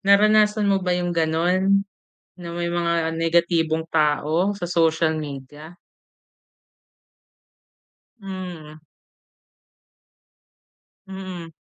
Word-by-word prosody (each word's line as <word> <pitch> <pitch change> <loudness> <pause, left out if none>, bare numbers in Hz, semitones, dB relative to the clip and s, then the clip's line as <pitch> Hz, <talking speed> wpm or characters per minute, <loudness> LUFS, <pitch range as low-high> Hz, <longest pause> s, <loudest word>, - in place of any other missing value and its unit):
naranasan 210 +1 +4
mo 195 -1 +2
ba 180 -1 0
yung 175 0 -2
ganun? 180 +4 +1 0.6
Na 170 -1 -7
may 170 0 -2
mga 170 -1 0
negatibong 165 -1 +1
tao 155 +5 +1
sa 180 - -9
social 160 -2 +1
media? 150 +3 -9 2.5
Hmm. 180 -6 -8 2.3
Mm. 185 -4 -8
170 Hz, 75 wpm, -22 LUFS, 160-190 Hz, 2.5 s, naranasan